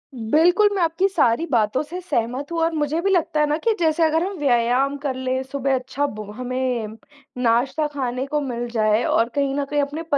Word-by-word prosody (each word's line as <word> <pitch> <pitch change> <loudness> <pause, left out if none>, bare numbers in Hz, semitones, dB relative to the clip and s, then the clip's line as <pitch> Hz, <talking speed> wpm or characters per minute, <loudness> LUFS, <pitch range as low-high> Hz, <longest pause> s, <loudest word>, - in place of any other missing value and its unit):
बिल्कुल, 330 - +3
मैं 380 - 0
आपकी 335 +4 +2
सारी 305 -4 +2
बातों 220 +2 +2
से 350 +5 -7
सहमत 260 -2 -2
हूँ 335 - -2
और 330 0 +1
मुझे 305 +1 -1
भी 390 - +1
लगता 330 -4 +1
है 300 - +4
ना 300 - +1
कि 455 - +3
जैसे 325 0 +2
अगर 320 +1 +2
हम 390 0 -4
व्यायाम 255 +1 +2
कर 275 -2 -3
ले 260 0 -2
सुबह 270 0 -1
अच्छा 260 +3 -2
भो 215 - -6
हमें 250 -1 -2 0.6
नाश्ता 260 +6 +2
खाने 255 -1 -2
को 300 +1 -1
मिल 240 -3 -3
जाये 215 -1 +2
और 230 +1 +2
कहीं 280 -1 +1
न 285 0 -1
कहीं 290 0 +1
अपने 295 +4 -4
280 Hz, 205 wpm, -22 LUFS, 245-320 Hz, 0.6 s, है